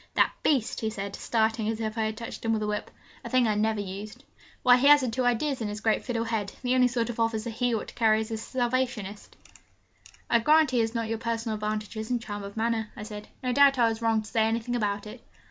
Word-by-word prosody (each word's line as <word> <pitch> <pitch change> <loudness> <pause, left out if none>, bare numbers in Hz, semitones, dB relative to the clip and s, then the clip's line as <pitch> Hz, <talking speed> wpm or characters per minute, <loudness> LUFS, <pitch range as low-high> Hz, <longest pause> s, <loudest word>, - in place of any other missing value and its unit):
'That - - +4
beast!' 265 -7 +1
he 220 - -1
said, 200 -2 -5
starting 220 -1 0
as 225 0 -2
if 220 -1 -3
I 220 -1 0
had 215 0 -3
touched 230 - -7
him 225 0 +1
with 215 -1 -1
a - - -1
whip 210 0 -3 0.3
a - - -6
thing 255 -2 +3
I 215 - +2
never 215 +1 +1
used 205 +2 -7 0.4
'why, 250 0 +7
he 270 +3 +3
hasn't 285 -5 +6
two 255 +2 0
ideas 245 +2 0
in 220 - -1
his 210 0 -5
great 220 0 +1
fiddle 235 -2 -2
head. 220 -3 -2
The 250 0 +1
only 255 -1 +5
sort 240 -1 -1
of 230 - -9
officer 225 0 0
he 240 +1 0
ought 220 - -4
to - - -13
carry 220 -1 +3
is 220 +1 -6
a 220 - -2
Salvationist!' 240 -4 -2 0.9
'I 235 - +4
grant 305 +3 +4
he 250 - +2
has 225 +1 0
not 230 -1 -1
your 225 0 -2
personal 230 -1 -2
advantages 215 +1 -4
and 245 -1 +1
charm 205 -3 -6
of 200 +2 -9
manner,' 225 -1 0
I - - -6
said. 210 0 -8 0.2
'No 250 -1 0
doubt 280 0 +6
I 235 -2 +4
was 225 0 -4
wrong 225 -1 +2
to - - -11
say 220 0 +2
anything 230 +2 -1
about 205 -3 -1
it.' 220 +3 -10
225 Hz, 250 wpm, -27 LUFS, 215-245 Hz, 0.9 s, why